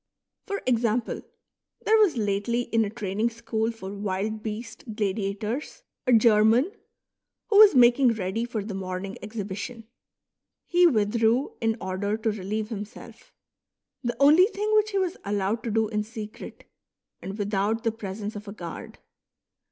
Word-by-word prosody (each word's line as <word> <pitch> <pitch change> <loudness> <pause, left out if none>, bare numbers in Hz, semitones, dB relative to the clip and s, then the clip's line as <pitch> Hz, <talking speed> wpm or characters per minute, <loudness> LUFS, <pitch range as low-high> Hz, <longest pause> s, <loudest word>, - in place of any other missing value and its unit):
For 400 -1 -3
example, 235 -1 0 0.6
there 440 +1 +5
was 375 - +4
lately 205 +3 0
in 230 -2 +1
a 205 - -2
training 215 0 -1
school 225 -1 -2
for 200 -4 -8
wild 205 +2 -3
beast 220 +1 -7
gladiators 210 - -3 0.2
a - - +4
German, 225 - +5 0.8
who 410 - +6
was 420 -7 +9
making 245 0 +6
ready 195 +2 -2
for 235 -3 -3
the 205 0 -6
morning 190 +1 -4
exhibition; 215 +2 -6 0.8
he 355 0 +5
withdrew 230 0 +2
in 225 0 +1
order 195 +3 -2
to 220 0 0
relieve 210 +1 -3
himself, 210 +1 -9 0.4
— - - -58
the 240 -1 -2
only 305 +7 +7
thing 425 0 -2
which 430 0 +4
he 400 - -2
was 370 -2 0
allowed 205 +2 -1
to - - -1
do 220 0 +1
in 210 -1 -1
secret 215 -1 -8 0.6
and 195 +2 -6
without 205 +2 0
the 225 - +1
presence 210 -1 -6
of 205 +1 -8
a 200 - -6
guard. 175 -5 -8
220 Hz, 150 wpm, -26 LUFS, 205-240 Hz, 0.8 s, was